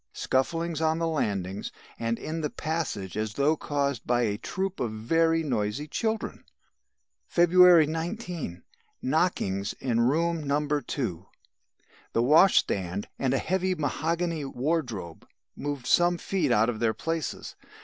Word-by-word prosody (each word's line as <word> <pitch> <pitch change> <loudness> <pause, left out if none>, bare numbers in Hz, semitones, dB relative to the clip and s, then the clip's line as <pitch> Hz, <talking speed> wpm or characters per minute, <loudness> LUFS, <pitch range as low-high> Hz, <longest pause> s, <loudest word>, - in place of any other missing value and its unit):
Scufflings 165 +4 0
on 160 0 +2
the 165 0 0
landings, 100 - -2 0.3
and 115 0 -1
in 160 +1 -4
the 150 - -1
passage 140 - -3
as 105 0 -3
though 145 +3 +3
caused 140 -5 -2
by 120 0 +2
a 105 -2 -1
troop 190 +7 -3
of 120 - 0
very 165 +9 +1
noisy 120 +1 -2
children. 220 +7 -2 0.8
"February 175 -1 +6
19. 165 - -4 0.4
Knockings 130 - 0
in 120 -3 -1
room 165 +6 +1
No. 145 +1 0
2. 120 - -2 0.9
The 115 - +2
washstand 100 - +3
and 130 0 +1
a - - +3
heavy 185 +5 0
mahogany 165 +2 -1
wardrobe 125 - -3 0.3
moved 145 -3 -4
some 175 0 +4
feet 190 +1 -1
out 110 +2 +4
of 115 -3 -2
their 110 -1 +1
places. 165 -1 -4
145 Hz, 130 wpm, -27 LUFS, 115-165 Hz, 0.9 s, February